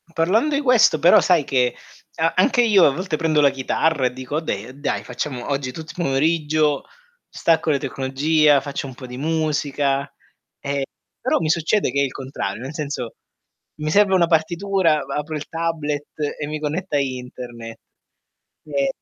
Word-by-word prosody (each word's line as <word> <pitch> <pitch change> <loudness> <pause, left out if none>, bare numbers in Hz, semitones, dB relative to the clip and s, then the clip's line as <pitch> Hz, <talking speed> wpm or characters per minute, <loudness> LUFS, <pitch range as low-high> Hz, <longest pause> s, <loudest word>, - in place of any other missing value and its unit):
Parlando 220 - +2
i 280 - +1
questo, 245 - +4
però, 170 +4 +6
sai 175 -5 +3
che 125 -3 +1 0.4
a 165 0 +1
anche 245 +6 +4
io 205 -6 +5
a - - +6
volte 180 +1 -3
prendo 160 -1 +1
la 140 - +6
chitarra 135 +2 0
e 125 - -5
dico: 130 +2 -6
"Okay, 130 -4 -4
dai, 145 - -2
facciamo 125 -5 -5
oggi 135 -2 -2
tutto 160 +4 -8
i - - -17
pomeriggio, 150 0 +1 0.5
stacco 165 -1 +1
le 145 -2 +2
tecnologia, 145 +3 +2
faccio 140 0 -5
un 130 - -10
po' 130 - -10
di 125 0 -8
musica", 145 -2 -1 0.5
ehm, 140 0 -2 0.4
però 255 - +1
mi 160 -2 -1
succede 165 +1 +1
che 140 - +1
è - - +3
il 135 - -1
contrario, 130 -6 -5
nel 135 +4 -6
senso: 140 -6 -4 0.7
mi 155 - -1
serve 200 +1 +4
una 175 -3 +4
partitura, 170 -1 +1
ba 140 - -5
apro 150 +1 -3
il 150 -1 -5
tablet 155 -3 -2 0.3
e 145 - -3
mi 155 +1 -4
connetto 155 +3 -3
a - - +3
Interne, 125 -3 -6 0.9
ehm, 140 -2 0
150 Hz, 175 wpm, -21 LUFS, 135-165 Hz, 0.9 s, però